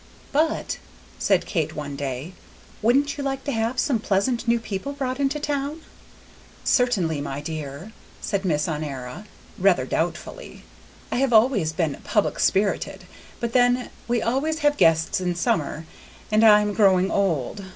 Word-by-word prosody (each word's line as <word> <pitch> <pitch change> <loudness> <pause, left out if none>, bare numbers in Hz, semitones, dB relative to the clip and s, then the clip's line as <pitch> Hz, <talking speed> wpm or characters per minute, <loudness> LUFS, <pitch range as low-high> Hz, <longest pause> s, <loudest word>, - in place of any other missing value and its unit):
"But," 310 +3 0 0.4
said - - +2
Kate 160 -4 -2
one 145 -2 -5
day, 140 +4 -4 0.5
"wouldn't 275 +6 +2
you - - -2
like 270 -1 -2
to 285 - -2
have 230 +1 -1
some 250 -2 +1
pleasant 225 +4 0
new 235 0 +3
people 225 +5 -5
brought 265 -2 -3
into 280 +2 0
town?" 290 +1 -2 0.8
"Certainly, 190 - +2
my 140 -1 -4
dear," 150 +4 -6 0.3
said 200 -2 -2
Miss 150 -5 0
Honora, 150 +3 -5 0.3
rather - - +3
doubtfully; - - -4 0.5
"I - - 0
have 265 -1 +1
always 220 -8 +4
been 155 -3 -2
public 210 - 0
spirited; 195 -1 +1 0.4
but 235 -1 -3
then, 245 0 +3 0.2
we 240 -1 0
always 300 +7 0
have 290 0 +4
guests 165 - +3
in 180 -1 -1
summer, 160 -2 -1 0.5
and 215 +1 +4
I 210 -1 +8
am 210 0 -1
growing 190 -3 +4
old. 190 -2 0
210 Hz, 150 wpm, -24 LUFS, 160-255 Hz, 0.8 s, I